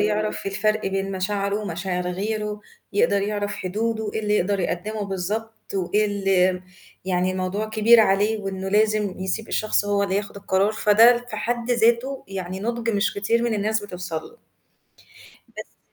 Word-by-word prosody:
يعرف 210 0 0
الفرق 215 +2 0
بين 195 0 -2
مشاعره 200 +1 -1
ومشاعر 180 -1 -3
غيره، 210 +2 -3 0.3
يقدر 200 0 +2
يعرف 205 0 -2
حدوده، 220 +3 -2
إيه - - 0
اللي 210 -1 0
يقدر 200 +1 +1
يقدّمه 205 +5 -2
بالضبط 205 +4 -4
وإيه 195 +3 +1
اللي 195 -2 +2
م 180 0 -7 0.4
يعني 185 0 0
الموضوع 185 +3 -2
كبير 220 +2 +6
عليه 210 +1 +2
وإنه 195 -1 -4
لازم 210 -1 +2
يسيب 190 +4 -3
الشخص 215 -1 +1
هو 205 0 +1
اللي 195 -1 0
ياخُد 200 0 -4
القرار، 200 +1 +1
فده 225 +3 +6
في 215 - -5
حد 235 +2 -2
ذاته 240 +3 +2
يعني 190 -1 -5
نُضج 235 +1 -1
مش 205 -1 0
كتير 225 +4 +1
من 235 -2 0
الناس 215 +1 0
بتوصل 180 -4 -5
له 470 +2 -17 1.1
بس - - -10
205 Hz, 160 wpm, -23 LUFS, 190-220 Hz, 1.1 s, كبير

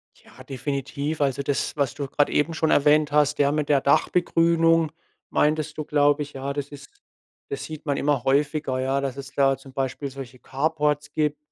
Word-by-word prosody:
Ja, - - -16
definitiv. 140 +2 -4
Also 140 -1 0
das, 140 0 -1
was 140 -3 0
du 145 -1 -5
grad 145 +2 +1
eben 160 +3 +1
schon 160 0 0
erwähnt 150 +1 +4
hast, 150 0 +2
ja 140 0 +4
mit 150 -1 -1
der 140 -2 +4
Dachbegrünung 165 +1 +3 0.4
meintest 155 +1 0
du, 155 - -2
glaube 145 0 +2
ich, 145 - -12
ja, 135 +1 -4
das 145 0 -4
ist 145 -1 -12 0.6
das 420 - -4
sieht 155 0 -8
man 145 - 0
immer 140 -3 0
häufiger, 140 -1 +1
ja, 135 +1 0
dass 135 -2 -3
es 135 0 -8
da 135 -1 +3
zum 135 +1 -14
Beispiel 135 +1 -3
solche 130 -1 -9
Carports 150 +2 -1
gibt, 150 -1 0
145 Hz, 190 wpm, -24 LUFS, 135-150 Hz, 0.6 s, erwähnt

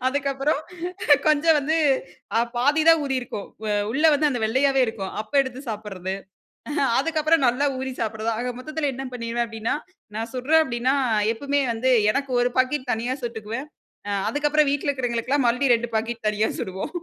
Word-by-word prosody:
அதுக்கப்புறம் 280 +2 0 0.7
கொஞ்சம் 310 +1 +4
வந்து 310 +4 0 0.6
அ - - +4 0.2
பாதிதான் 310 +5 +4
ஊறியிருக்கும், 255 -6 -3 0.2
அ 210 - +1 0.2
உள்ள 285 +6 -1
வந்து 300 +1 +2
அந்த 245 - -2
வெள்ளையாவே 265 +4 +2
இருக்கும். 200 -4 -4
அப்போ 215 +6 -9
எடுத்து 260 0 -6
சாப்பட்றது. 195 -3 -4 0.8
அதுக்கப்புறம் 315 0 +2
நல்லா 250 +4 +2
ஊறி 265 0 -3
சாப்பட்றது. 220 0 -2
ஆக 250 +1 -2
மொத்தத்துல 310 +1 -2
என்ன 265 +1 -6
பண்ணிடுவேன் 235 0 -2
அப்டின்னா, 225 0 -2 0.4
நான் 225 +1 -4
சுட்றேன் 300 +6 +3
அப்டின்னா, 255 0 0 0.4
எப்பவுமே 285 +4 0
வந்து 255 +3 +1 0.2
எனக்கு 275 +1 -2
ஒரு 245 - +2
பாக்கெட் 255 0 0
தனியா 240 +3 -2
சுட்டுக்குவேன். 230 +3 -5 0.4
அ. - - -1 0.2
அதுக்கப்புறம் 295 0 +2
வீட்ல 285 +1 -1
இருக்கிறவங்களுக்கெல்லாம் 255 0 0
மறுபடியும் 245 +1 +3
2 235 0 -6
பாக்கெட் 230 +1 -2
தனியா 210 +1 0
சுடுவோம். 190 0 -4
255 Hz, 150 wpm, -24 LUFS, 230-285 Hz, 0.8 s, கொஞ்சம்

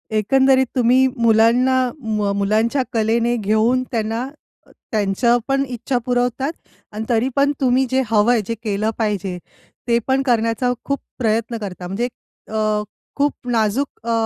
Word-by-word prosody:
एकंदरीत 265 +4 +3
तुम्ही 255 +1 +4
मुलांना, 235 +3 +4 0.3
म 210 -2 -1
मुलांच्या 220 +6 +1
कलेने 230 +2 +1
घेऊन, 220 +4 +1
त्यांना 225 +2 -2 0.6
त्यांच्या 215 +3 +2
पण 275 0 +1
इच्छा 245 +1 -2
पुरवतात 250 +3 0 0.4
आणि 215 +1 -5
तरी 240 +2 +2
पण 280 +1 +3
तुम्ही 260 +1 +3
जे 260 +1 +2
हवं 220 +2 +3
आहे, 230 -3 +3
जे 230 - -2
केलं 210 0 -1
पाहिजे, 200 -5 -2 0.5
ते 235 0 +3
पण 265 0 +2
करण्याचा 235 0 +1
खूप 280 0 -1 0.2
प्रयत्न 230 0 0
करता. 185 -4 -6
म्हणजे 215 +6 -2 0.4
अ, 215 -1 0 0.3
खूप 290 +1 +1 0.2
नाजूक 230 +4 +1 0.2
अ, 230 - +1
230 Hz, 140 wpm, -20 LUFS, 215-255 Hz, 0.6 s, तुम्ही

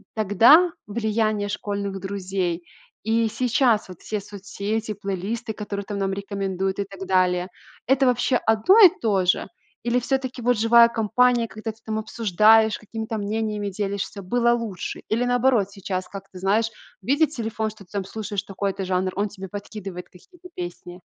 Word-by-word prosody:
тогда 230 - +6 0.2
влияние 215 -1 0
школьных 200 -1 -3
друзей 185 -3 -3 0.4
и 225 +1 +1
сейчас 240 -2 +2
вот 180 -2 -12
все 215 - -3
соцсети, 205 +2 -4
плейлисты, 205 +4 -4
которые 205 -1 -5
там 205 +1 -5
нам 195 0 0
рекомендуют, 195 -1 -3
и - - +1
так 195 -1 -9
далее- 180 -1 +2 0.4
это, 270 +1 +4
вообще, 250 +1 +2
одно 225 - +4
и - - +10
то 200 -5 +1
же? 180 - +2 0.4
Или 240 +1 +1
всё-таки, 260 0 -2
вот, 245 0 +2
живая 235 +2 +6
компания, 235 +2 +2
когда 220 0 -6
ты 215 - -21
там 220 0 -2
обсуждаешь, 220 0 +3
какими-то 220 +1 -5
мнениями 210 0 -2
делишься, 200 0 -4
было 235 +5 +2
лучше? 225 -6 -4
Или 230 +3 0
наоборот 245 -5 +2
сейчас, 185 -2 -4
как 195 -1 -9
ты 185 - -11
знаешь, 210 +4 +1 0.3
видит 285 - +2
телефон, 225 -5 -3
что 210 -2 -14
ты 180 - -32
там 200 - -1
слушаешь 205 0 -4
такой-то 195 0 -3
жанр, 185 0 -1
он 205 +1 0
тебе 195 -1 -9
подкидывает 200 -2 -8
какие-то 360 - -17
песни? 175 0 -7
210 Hz, 160 wpm, -23 LUFS, 195-230 Hz, 0.4 s, и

